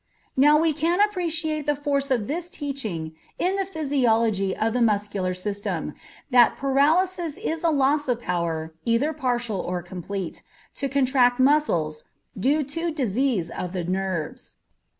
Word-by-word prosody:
Now 295 +3 +6
we 320 0 +2
can 330 +5 0
appreciate 330 -7 0
the 295 - +2
force 280 -1 -1
of 240 -6 +1
this 340 +7 -3
teaching 220 - -4 0.2
in 370 +2 +1
the 390 -1 -1
physiology 230 - +1
of 220 +1 0
the 250 - 0
muscular 205 -4 0
system, 200 +2 -3 0.4
that 245 -1 +5
"paralysis 315 +5 +2
is 325 +1 -3
a 335 - +4
loss 290 0 +2
of 245 -2 0
power, 165 -5 -2
either 235 +7 +1
partial 240 -7 -1
or 180 -1 -3
complete, 180 +1 -6 0.3
to 275 - -3
contract 260 -2 +3
muscles, 215 - +2 0.3
due 280 +9 +2
to 330 +5 -3
disease 250 - 0
of 180 0 -5
the 180 -2 -2
nerves." 185 -3 -3
260 Hz, 145 wpm, -24 LUFS, 195-300 Hz, 0.4 s, Now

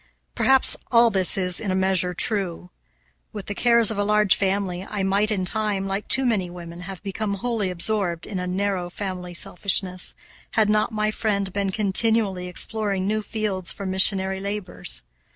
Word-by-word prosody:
Perhaps 265 - +5
all 235 -1 +5
this 190 -2 +3
is, 180 -2 0
in 210 - -4
a 185 - 0
measure, 190 -1 0
true. 180 -4 -2 0.6
With 205 -3 -7
the 205 - -5
cares 235 0 +5
of 210 - -4
a - - +1
large 210 -1 +3
family 190 -2 -2
I 200 0 -4
might, 200 +2 +1
in 195 -4 -2
time, 210 0 -2
like 195 +2 -4
too 265 - +5
many 205 -7 0
women, 170 -1 -10
have 190 +1 -9
become 200 +1 -3
wholly 220 -2 -2
absorbed 180 -1 0
in 195 -3 -5
a 180 - -4
narrow 185 -1 -2
family 180 -2 -6
selfishness, 185 0 +1 0.4
had 215 -2 +2
not 215 +1 +1
my 215 0 -1
friend 200 -4 -2
been 200 -1 -1
continually 200 -1 +1
exploring 200 +1 -1
new 215 +2 -1
fields 205 -4 -3
for 200 - -7
missionary 190 0 +2
labors. 195 - -3
195 Hz, 170 wpm, -23 LUFS, 185-215 Hz, 0.6 s, Perhaps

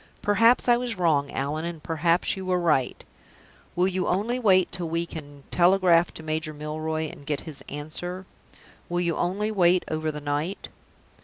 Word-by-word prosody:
"Perhaps 230 +5 +4
I 240 -1 +5
was 240 -3 -3
wrong, 150 -5 +2
Allan, 145 +4 -2
and 170 -2 -6
perhaps 165 +2 +1
you 190 - -6
were 185 -1 +1
right. 150 -7 +1 0.7
Will 180 +1 +3
you 185 -1 -1
only 220 +7 0
wait 190 -6 +4
till 175 -3 -3
we 165 +1 -1
can 145 -4 -10
telegraph 175 -1 +4
to 160 - -9
Major 155 0 -3
Milroy 155 +1 -3
and 145 - -11
get 145 0 -2
his 155 -4 -8
answer? 175 +6 -5 0.6
Will 175 0 0
you 170 -2 0
only 200 +5 -1
wait 180 -3 +3
over 155 0 -1
the 150 - -6
night?" 145 +6 -3
170 Hz, 170 wpm, -25 LUFS, 155-185 Hz, 0.7 s, I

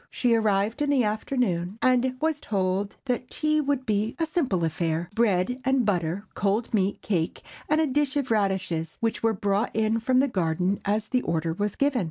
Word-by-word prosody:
She 245 -2 +1
arrived 220 +3 +1
in 290 - +1
the 275 -4 +3
afternoon, 210 -4 -1
and 255 +1 +2
was 310 0 0
told 195 0 -1
that 250 -1 -2
tea 305 0 +1
would 280 -2 -1
be 215 -1 0
a 330 - +1
simple 265 - 0
affair—bread 180 - 0
and 265 -2 +2
butter, 180 0 -1
cold 210 +4 -1
meat, 200 -2 0
cake, 170 -6 -1 0.3
and 305 +1 +3
a 320 - +3
dish 290 +1 0
of 270 -4 -1
radishes, 190 -6 0
which 225 -1 -1
were 225 0 +2
brought 205 +2 0
in 220 +1 +1
from 255 +3 +1
the 275 - +3
garden 185 - 0
as 210 +2 0
the 255 -1 +1
order 165 -3 -1
was 205 +3 -2
given. 280 -2 +1
220 Hz, 185 wpm, -26 LUFS, 190-255 Hz, 0.3 s, the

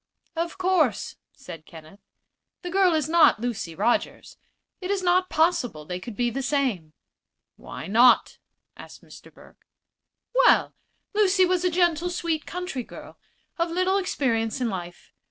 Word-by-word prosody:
"Of 335 +2 -3
course," 360 - 0
said 165 -3 -12
Kenneth, 160 +4 -14 0.6
"the 355 - -5
girl 375 -2 +3
is 310 -3 0
not 320 -8 +4
Lucy 220 -8 -4
Rogers. 240 - -1 0.4
It 370 -1 -6
is 395 -2 -1
not 365 +1 +2
possible 255 - 0
they 180 +2 -5
could 210 +4 -9
be 240 +1 0
the 270 +4 -3
same." 250 - -1 0.6
"Why - - -9
not?" 235 +5 +4 0.4
asked - - -13
Mr. - - -15
Burke. - - -20 0.7
"Well, - - +4 0.4
Lucy 390 -3 +3
was 365 0 0
a 365 - +2
gentle, 345 -1 +1
sweet 335 -3 -3
country 360 -7 -4
girl, - - -12 0.4
of 335 0 +1
little 370 +3 +1
experience 235 - -1
in 245 -2 -1
life. 175 -2 -8
315 Hz, 145 wpm, -25 LUFS, 225-360 Hz, 0.7 s, not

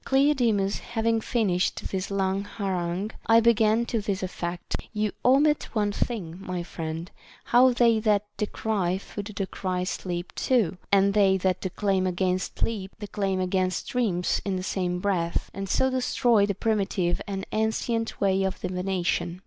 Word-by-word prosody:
Cleodemus 245 -8 +2
having 225 -1 0
finished 200 -7 0
this 190 0 -2
long 195 -1 0
harangue, 190 -1 -3 0.2
I 225 +1 +7
began 225 0 +3
to 230 -2 -1
this 195 -2 -2
effect. 175 -1 -4 0.2
You 210 -1 0
omit 290 +4 +4
one 205 -1 +2
thing, 195 -6 -3
my 185 -2 -4
friend, 165 0 -5 0.3
how 255 +2 +5
they 235 -2 +4
that 210 -2 +2
decry 205 -4 -1
food 200 +1 -7
decry 185 -2 -2
sleep 175 -1 -4
too, 210 -9 +1
and 200 0 +4
they 195 -2 +4
that 185 0 0
declaim 190 0 0
against 185 0 -1
sleep 200 -4 -2
declaim 200 -3 -2
against 185 0 0
dreams 215 -9 0
in 195 -2 -1
the 185 - -3
same 180 -2 -1
breath, 175 -4 -1
and 195 0 -5
so 260 +5 +2
destroy 245 -4 +2
the 200 - -1
primitive 195 -5 0
and 195 -1 -4
ancient 225 +1 -1
way 195 -1 +2
of 190 -1 -1
divination. 180 -1 -1
195 Hz, 150 wpm, -26 LUFS, 185-220 Hz, 0.3 s, I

